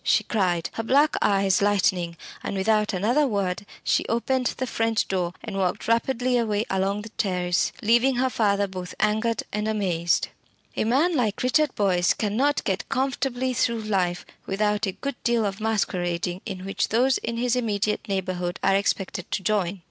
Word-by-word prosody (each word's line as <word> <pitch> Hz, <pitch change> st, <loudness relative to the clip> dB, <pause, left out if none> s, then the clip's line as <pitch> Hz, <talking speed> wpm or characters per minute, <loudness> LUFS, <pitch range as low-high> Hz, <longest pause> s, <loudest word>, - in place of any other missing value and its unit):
she -, -, +3 dB
cried, 180 Hz, -6 st, 0 dB
her -, -, -2 dB
black 280 Hz, +6 st, +3 dB
eyes 195 Hz, -2 st, +3 dB
lightening, 185 Hz, -4 st, +1 dB, 0.2 s
and -, -, -4 dB
without 210 Hz, +2 st, +2 dB
another 235 Hz, +10 st, +2 dB
word 200 Hz, -4 st, -1 dB, 0.2 s
she -, -, +2 dB
opened 250 Hz, +2 st, 0 dB
the 260 Hz, -, -1 dB
French 225 Hz, -2 st, 0 dB
window 180 Hz, -2 st, 0 dB
and -, -, -6 dB
walked 185 Hz, +1 st, -1 dB
rapidly 245 Hz, +2 st, +1 dB
away 215 Hz, -2 st, 0 dB
along 195 Hz, +2 st, 0 dB
the 225 Hz, -, -9 dB
terrace, 180 Hz, -4 st, 0 dB
leaving 240 Hz, +4 st, +4 dB
her 255 Hz, +2 st, +2 dB
father 205 Hz, -5 st, +1 dB
both 185 Hz, -2 st, -7 dB
angered 220 Hz, +2 st, +1 dB
and 210 Hz, +1 st, -1 dB
amazed. 180 Hz, -6 st, 0 dB, 0.5 s
A -, -, 0 dB
man 290 Hz, +10 st, +2 dB
like 225 Hz, -6 st, 0 dB
Richard 290 Hz, +3 st, +2 dB
Boyce 185 Hz, -3 st, +2 dB
cannot 245 Hz, +8 st, 0 dB
get 190 Hz, -1 st, -2 dB
comfortably 260 Hz, -1 st, -1 dB
through 235 Hz, -2 st, 0 dB
life 185 Hz, -5 st, -1 dB, 0.2 s
without 210 Hz, +2 st, 0 dB
a 190 Hz, -, -2 dB
good 280 Hz, +3 st, -6 dB
deal 235 Hz, -2 st, +2 dB
of 200 Hz, +1 st, -3 dB
masquerading 180 Hz, -4 st, -1 dB
in 190 Hz, -3 st, -6 dB
which 195 Hz, -, -1 dB
those 250 Hz, +3 st, +3 dB
in 230 Hz, 0 st, -4 dB
his 245 Hz, +1 st, +1 dB
immediate 215 Hz, -3 st, -1 dB
neighbourhood 185 Hz, -2 st, -2 dB
are 195 Hz, 0 st, +4 dB
expected 195 Hz, -2 st, -1 dB
to 195 Hz, -, -2 dB
join. 195 Hz, -1 st, 0 dB
210 Hz, 170 wpm, -25 LUFS, 190-235 Hz, 0.5 s, leaving